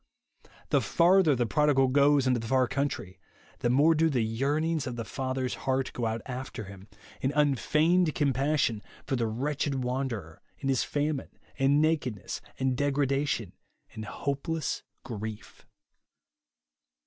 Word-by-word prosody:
The -, -, +3 dB
farther 175 Hz, -3 st, +4 dB
the 120 Hz, -1 st, +1 dB
prodigal 140 Hz, +1 st, +3 dB
goes 140 Hz, 0 st, +4 dB
into 125 Hz, -2 st, +2 dB
the 115 Hz, -, -6 dB
far 130 Hz, +1 st, +3 dB
country, 140 Hz, -10 st, -3 dB, 0.4 s
the 120 Hz, -, 0 dB
more 145 Hz, +6 st, +5 dB
do 160 Hz, +1 st, +3 dB
the 125 Hz, -6 st, +1 dB
ycc" 145 Hz, +3 st, +2 dB
.nings 160 Hz, -3 st, -1 dB
of 125 Hz, -, -4 dB
the 115 Hz, -1 st, -4 dB
father's 130 Hz, -1 st, -2 dB, 0.2 s
heart 130 Hz, 0 st, 0 dB
go 120 Hz, -2 st, -1 dB
out 110 Hz, 0 st, -3 dB
after 125 Hz, -3 st, -6 dB
him, 100 Hz, 0 st, -11 dB, 0.3 s
in 135 Hz, -, +1 dB
unfeigned 155 Hz, +4 st, +3 dB
compassion 140 Hz, -4 st, +1 dB, 0.2 s
for 135 Hz, -, -1 dB
the 115 Hz, -2 st, 0 dB
wretched 135 Hz, +3 st, -1 dB
wanderer, 125 Hz, -, -3 dB, 0.2 s
in 135 Hz, -, -3 dB
his 130 Hz, -2 st, +2 dB
famine, 145 Hz, -1 st, -2 dB, 0.2 s
and 140 Hz, +3 st, +4 dB
nakedness, 145 Hz, -, -1 dB, 0.2 s
and 130 Hz, -1 st, 0 dB
degradation, 140 Hz, -6 st, 0 dB, 0.4 s
and 110 Hz, -, -6 dB
hopeless 140 Hz, +7 st, -3 dB, 0.2 s
grief. 110 Hz, -2 st, -7 dB
135 Hz, 140 wpm, -28 LUFS, 120-145 Hz, 0.4 s, more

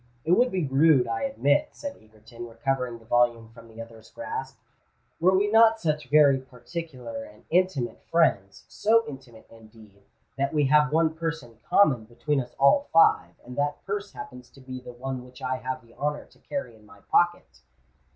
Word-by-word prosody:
"It 165 Hz, -, 0 dB
would 245 Hz, +7 st, +4 dB
be 185 Hz, -4 st, -1 dB
rude, 135 Hz, -1 st, +4 dB
I 115 Hz, -1 st, -3 dB
admit," 145 Hz, -5 st, +1 dB
said 285 Hz, -1 st, -7 dB
Egerton, 110 Hz, +2 st, -13 dB
recovering 125 Hz, +1 st, -3 dB
the 115 Hz, -, -20 dB
volume 120 Hz, -1 st, +1 dB
from 115 Hz, 0 st, -15 dB
the 115 Hz, 0 st, -15 dB
other's 115 Hz, -1 st, -11 dB
grasp, 445 Hz, +10 st, -6 dB, 0.6 s
"were 185 Hz, +3 st, +4 dB
we 205 Hz, +2 st, +2 dB
not 225 Hz, 0 st, +5 dB
such 150 Hz, -7 st, -2 dB
very 145 Hz, -2 st, +5 dB
particular 125 Hz, -2 st, -8 dB
and 105 Hz, -1 st, -16 dB
intimate 175 Hz, -8 st, 0 dB
friends—so 165 Hz, -, +1 dB
intimate 130 Hz, -5 st, -11 dB
indeed, 110 Hz, -3 st, -17 dB, 0.4 s
that 140 Hz, +3 st, -1 dB
we 150 Hz, -1 st, +3 dB
have 150 Hz, +1 st, +4 dB
one 160 Hz, 0 st, +2 dB
purse 160 Hz, -2 st, -4 dB
in 115 Hz, -2 st, -17 dB
common 135 Hz, -, +4 dB
between 125 Hz, +5 st, -2 dB
us 125 Hz, -, -11 dB
all 280 Hz, -, +4 dB
five, 165 Hz, -, +4 dB
and 125 Hz, +1 st, -9 dB
that 145 Hz, 0 st, -2 dB
purse 200 Hz, 0 st, -4 dB
happens 125 Hz, 0 st, -10 dB
to -, -, -19 dB
be 130 Hz, -1 st, -8 dB
the 125 Hz, -, -10 dB
one 130 Hz, +1 st, -5 dB
which 125 Hz, 0 st, -15 dB
I 130 Hz, 0 st, -2 dB
have 130 Hz, 0 st, -5 dB
the 115 Hz, -, -21 dB
honour 150 Hz, 0 st, -3 dB
to -, -, -24 dB
carry 280 Hz, -, -6 dB
in 110 Hz, -, -21 dB
my 105 Hz, -, -18 dB
pocket." 175 Hz, 0 st, 0 dB
135 Hz, 180 wpm, -26 LUFS, 115-165 Hz, 0.6 s, not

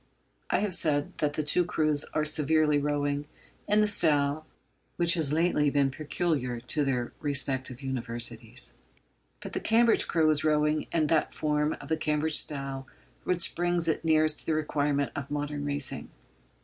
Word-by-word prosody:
I -, -, +1 dB
have 205 Hz, -3 st, 0 dB
said 145 Hz, -4 st, -1 dB
that 150 Hz, -1 st, 0 dB
the 155 Hz, -, -2 dB
two 155 Hz, +4 st, +3 dB
crews 155 Hz, -3 st, +1 dB
are 155 Hz, -, -2 dB
severally 150 Hz, 0 st, +2 dB
rowing 145 Hz, 0 st, -1 dB, 0.4 s
in 210 Hz, +1 st, +3 dB
the 210 Hz, -, +3 dB
style 155 Hz, -5 st, +1 dB, 0.5 s
which 170 Hz, -1 st, +4 dB
has 155 Hz, -5 st, +1 dB
lately 155 Hz, -2 st, +2 dB
been 140 Hz, -1 st, +1 dB
peculiar 145 Hz, -4 st, -2 dB
to 135 Hz, +5 st, -2 dB
their 125 Hz, -3 st, -1 dB
respective 135 Hz, -2 st, -3 dB
Universities. 120 Hz, -3 st, -2 dB, 0.7 s
But -, -, -8 dB
the -, -, -1 dB
Cambridge 230 Hz, +1 st, +3 dB
crew 160 Hz, -2 st, +2 dB
is 150 Hz, -1 st, 0 dB
rowing 150 Hz, 0 st, +1 dB
in 160 Hz, -2 st, +1 dB
that 155 Hz, 0 st, 0 dB
form 150 Hz, 0 st, 0 dB
of -, -, -10 dB
the 160 Hz, -, 0 dB
Cambridge 155 Hz, 0 st, +1 dB
style 135 Hz, -2 st, +1 dB, 0.4 s
which 180 Hz, -1 st, +1 dB
brings 175 Hz, -1 st, 0 dB
it 160 Hz, -, 0 dB
nearest 155 Hz, -1 st, +2 dB
to -, -, -9 dB
the 160 Hz, -, +1 dB
requirements 145 Hz, -3 st, -1 dB
of 140 Hz, -1 st, -5 dB
modern 145 Hz, 0 st, -3 dB
racing. 145 Hz, -2 st, -3 dB
150 Hz, 160 wpm, -28 LUFS, 140-160 Hz, 0.7 s, which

